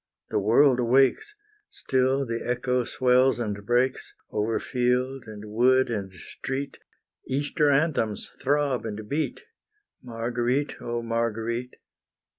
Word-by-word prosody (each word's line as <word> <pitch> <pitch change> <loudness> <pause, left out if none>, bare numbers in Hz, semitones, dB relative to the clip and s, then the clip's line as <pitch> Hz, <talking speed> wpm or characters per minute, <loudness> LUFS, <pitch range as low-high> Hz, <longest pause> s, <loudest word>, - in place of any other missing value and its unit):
the - - +1
world 125 +6 +4
awakes, 135 - +2 0.3
Still 130 +1 0
the 115 -1 -3
echo 125 0 0
swells 130 +1 +3
and 105 -4 -3
breaks, 125 +4 0 0.2
Over 110 +2 0
field, 125 +1 -1
and 105 -1 -9
wood, 125 +4 +3
and 100 -4 -3
street 135 +9 -6 0.5
Easter 145 +2 +1
anthems 135 -7 0
throb 140 -2 +1
and 110 -1 -6
beat, 145 0 -2 0.6
Marguerite, 120 +3 -2
oh 120 0 -3
Marguerite! 115 +1 -2
125 Hz, 110 wpm, -26 LUFS, 115-135 Hz, 0.6 s, world